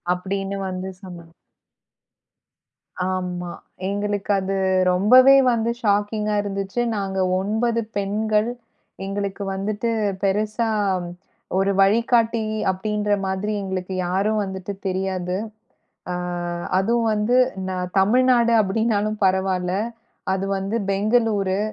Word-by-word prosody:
அப்டின்னு 195 +2 -3
வந்து 185 +1 -4
சொன்னாங்க. 170 -3 -11 1.8
ஆமா. 180 -1 -3 0.4
எங்களுக்கு 205 0 -2
அது 190 +1 -2 0.4
ரொம்பவே 255 +9 +7 0.2
வந்து 230 0 0
ஷாக்கிங்கா 210 0 +1
இருந்துச்சு. 200 +3 -3 0.2
நாங்க 195 -1 -2 0.2
9 225 +4 0 0.2
பெண்கள். 210 +2 0 0.6
எங்களுக்கு 200 0 -3
வந்துட்டு 205 +4 -2 0.3
பெருசா 215 +3 0 0.9
ஒரு 195 +1 +2
வழிகாட்டி 230 +2 +3 0.3
அப்டின்ற 210 +2 -2 0.2
மாதிரி 190 +3 -2
எங்களுக்கு 190 -1 -4
யாரும் 205 +4 +1
வந்துட்டு 190 0 -5
தெரியாது. 185 -1 -2 0.8
ஆ, - - -2 0.6
அதுவும் 230 +4 +1
வந்து 210 +4 +1 0.6
தமிழ்நாடு 240 +3 +4
அப்டின்னாலும் 215 +1 0
பரவாயில்ல, 185 -1 +1 0.6
அது 190 0 -1
வந்து 195 +4 -2
பெங்களூரு. 205 -2 +1
200 Hz, 90 wpm, -22 LUFS, 190-215 Hz, 1.8 s, ரொம்பவே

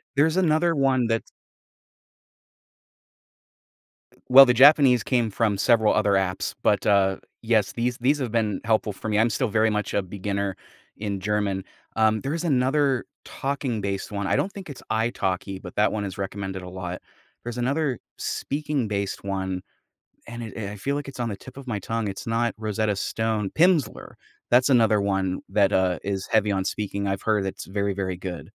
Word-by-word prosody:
There's 160 +5 +3
another 165 -1 +3
one 130 -4 +2
that's 115 -1 -2 3.0
Well, 135 +2 +10
the 125 - +3
Japanese 135 -1 +6
came 120 -4 +1
from 105 -1 0
several 110 +1 +3
other 100 - +2
apps, 95 -1 0
but, 100 -1 +2
uh, 95 -2 +3 0.2
yes, 110 -3 +1
these 120 +1 -1
these 140 +4 +2
have 125 -5 -3
been 110 -4 0
helpful 110 -2 +1
for 110 - -6
me, 105 0 +2
I'm 115 +1 +4
still 125 +3 0
very 110 +1 +2
much 105 0 -2
a 100 - +2
beginner 100 +1 -3 0.4
in 100 -2 -3
German, 100 -1 -1 0.3
um, 110 -1 +2
there 135 +2 -3
is 165 +1 -3
another 135 -2 +2 0.2
talking-based 115 -9 -3
one, 100 -1 -3
I - - +2
don't 200 - 0
think 190 -5 -9
it's 140 - -9
Italki, 95 -4 -1
but 90 - -10
that 105 - +3
one 105 -1 -2
is 95 -1 -6
recommended 95 -1 -4
a 90 - -8
lot. 90 -1 -6 0.4
There's 120 0 -6
another 135 +1 0 0.2
speaking-based 120 -11 -2
one, 95 -2 -3 0.7
and 115 0 -7
it 110 -1 -8
I 105 - -7
feel 140 +8 -2
like 145 -1 -4
it's 135 -2 -9
on 120 -1 -1
the 100 - -4
tip 130 - -13
of 135 - -10
my 105 -4 -2
tongue, 115 +2 -3
it's 95 +3 -6
not 115 +1 0
Rosetta 110 -1 -1
Stone 110 0 -1
Pimsleur, 170 -3 +2 0.4
that's 125 +3 +5
another 110 -5 +4
one 95 -2 -1
that, 100 -2 +2
uh, 90 -1 +2
is 95 -1 -3
heavy 110 -2 +2
on 95 -1 0
speaking, 100 0 -3
I've 95 0 -2
heard 105 -3 +1
it's 95 +1 -5
very, 100 +1 -1
very 95 -1 -3
good. 90 -1 -6
110 Hz, 175 wpm, -24 LUFS, 100-125 Hz, 3.0 s, Well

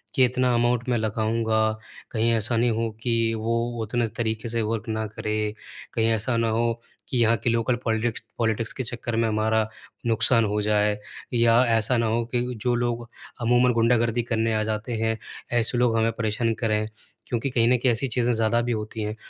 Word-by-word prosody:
कि 130 -3 +6
इतना 125 0 +1
अमाउंट 120 0 +1
मैं 120 - +2
लगाऊँगा 110 0 0 0.5
कहीं 115 0 +1
ऐसा 115 +1 +1
नहीं 120 0 +3
हो 115 +1 -1
कि 115 -2 +1
वो 115 +1 -1 0.3
उतने 115 +2 0
तरीके 110 0 -2
से 115 0 -1
वर्क 110 0 -3
ना 110 0 -1
करे। 110 0 -4 0.6
कहीं 115 -1 +1
ऐसा 115 +2 0
ना 115 0 +1
हो 115 +1 +1 0.4
कि 125 - -1
यहाँ 115 0 +4
के - - +2
लोकल 115 +2 +1
पॉलिटिक्स 110 0 0 0.2
पॉलिटिक्स 115 -1 0
के 130 - -3
चक्कर 120 -1 -2
में 115 - +2
हमारा 110 0 +1 0.4
नुकसान 115 +1 +4
हो 105 0 0
जाए 105 0 +2 0.4
या 115 0 +4
ऐसा 115 +3 +2
ना 115 -1 +1
हो 115 +1 0
कि 120 - +2 0.2
जो 120 +1 +1
लोग 120 -1 -2 0.3
अमूमन 120 +1 +3
गुंडागर्दी 115 0 +2
करने 115 -1 0
आ 110 - +1
जाते 110 +2 -3
हैं 110 0 0 0.4
ऐसे 115 +2 +1
लोग 120 -2 +2
हमें 115 0 +2
परेशान 115 +1 0
करें 110 -2 0 0.4
क्योंकि 120 +3 -1
कहीं 115 -3 +2
न 125 - +5
कहीं 125 +1 +2
ऐसी 120 +4 0
चीज़ें 125 0 +1
ज़्यादा 115 +1 +2
भी 120 +1 -2
होती 110 0 -4
हैं। 105 +1 -3
115 Hz, 195 wpm, -25 LUFS, 110-120 Hz, 0.6 s, कि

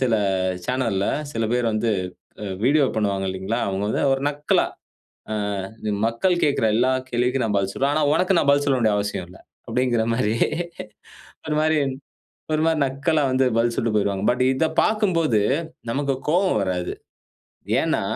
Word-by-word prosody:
சில 125 -3 +2 0.5
சேனல்‌ல 115 -7 0 0.3
சில 115 0 -1
பேரு 120 -1 +1
வந்து 110 +2 0 0.7
வீடியோ 145 +4 +4
பண்ணுவாங்க 100 -3 0
இல்லைங்களா? 95 +5 -3
அவங்க 95 0 -2
வந்து - - 0
ஒரு 135 - +1
நக்கலா, 145 0 +1 0.7
"ஆ - - 0 0.7
மக்கள் 115 +11 +1
கேட்கிற 140 -6 +2
எல்லா 125 +3 +3 0.2
கேள்விக்கும் 125 +1 +1
நான் 105 -2 0
பதில் 100 0 -2
சொல்லுவேன். 140 +6 0
ஆனா 155 - +2
உனக்கு 185 +2 +2
நான் 140 - +1
பதில் 145 0 +3
சொல்ல 135 -2 +2
வேண்டிய 110 -3 +2
அவசியம் 100 -3 -3
இல்ல." 90 - -14 0.3
அப்படின்கிற 120 -1 +1
மாரி 110 -2 0 1.1
ஒரு 150 - 0
மாரி 155 0 +2 0.8
ஒரு 155 - +1
மாரி 165 -1 +2
நக்கலா 140 +4 0
வந்து 130 0 +2
பதில் 115 +1 +2
சொல்லிட்டு 115 -2 0
போயிறுவாங்க. 100 -1 0
பட் 125 - -2
இதப் 160 +4 -1
பார்க்கும்போது 170 - +2 0.5
நமக்கு 140 +3 0 0.2
கோவம் 180 - +2
வராது. 90 -2 -2 0.9
ஏன்னா - - 0
125 Hz, 150 wpm, -23 LUFS, 110-145 Hz, 1.1 s, வீடியோ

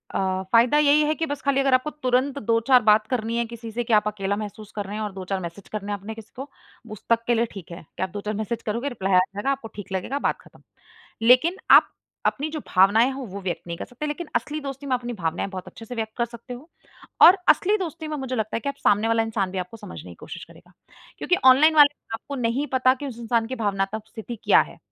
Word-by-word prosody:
अ, 190 0 0
फ़ायदा 235 +5 +5
यही 300 0 +5
है 305 - +1
कि 325 - -2
बस 285 -2 -5
खाली 275 0 +1
अगर 270 -1 +2
आपको 255 +4 +2
तुरंत 255 +2 +1
2-4 235 +3 +4
बात 215 +1 +4
करनी 235 -2 -2
है 235 - 0
किसी 230 -1 -9
से 240 +2 -2
कि 230 - -1
आप 210 0 +4
अकेला 200 -1 -2
महसूस 215 0 -7
कर 205 -2 -3
रहे 205 +2 -6
हैं। 220 - -4
और 210 - -4
2-4 190 0 -4
मैसेज 175 +2 -8
करने 205 -1 -5
आपने 205 +2 -6
किसी 225 -1 -12
को, 270 +3 -7 0.4
उस 215 - -9
तक 230 0 +3
के 240 - +3
लिए 230 +1 +2
ठीक 180 -4 -10
है 170 - -8 0.2
कि - - -1
आप 190 - -2
2-4 210 +3 -4
मैसेज 220 +2 -3
करोगे 235 +6 -2
रिप्लाई 195 -6 -2
आ - - +7
जाएगा, 200 +7 -2
आपको 270 -4 -4
ठीक 205 -2 -9
लगेगा 195 +10 -2
बात - - 0
खत्म। - - -20 0.6
लेकिन 255 +11 +5
आप - - +7 0.3
अपनी 295 +3 0
जो 310 0 -5
भावनाएँ 205 +7 +4
हों 265 -2 -6
वो 200 +2 -7
व्यक्त 180 -3 -3
नहीं 170 0 -5
कर - - -6
सकते, 250 +5 -7
लेकिन 300 +3 -4
असली 305 +1 -1
दोस्ती 275 0 -7
में 255 - +2
अपनी 245 0 -5
भावनाएँ 170 -3 -2
बहुत 185 -2 -7
अच्छे 225 - -11
से 245 - -7
व्यक्त 220 -1 -4
कर 235 - +1
सकते 235 +1 -10
हो। 275 +7 -12 0.5
और 375 +3 +9
असली 410 +3 +4
दोस्ती 330 -4 -5
में 305 - -3
मुझे 265 -2 -4
लगता 220 -1 -2
है - - -2
कि 280 - -4
आप 280 - -4
सामने 210 +2 +2
वाला 225 0 +2
इंसान 215 -4 -2
भी 190 - -4
आपको 180 +5 -6
समझने 85 - -10
की - - -10
कोशिश - - -8
करेगा - - -19 0.5
क्योंकि 360 - +1
ऑनलाइन 290 +5 +7
वाले 290 -1 +7 0.2
आपको 280 +5 -6
नहीं 250 +3 -1
पता 255 0 +4
कि 285 +2 -7
उस 240 -3 -7
इंसान 230 -1 0
की 260 - -4
भावनात्मक 205 0 -2
स्थिति 230 +1 -8
क्या - - +6
है? - - -12
230 Hz, 255 wpm, -24 LUFS, 205-270 Hz, 0.6 s, और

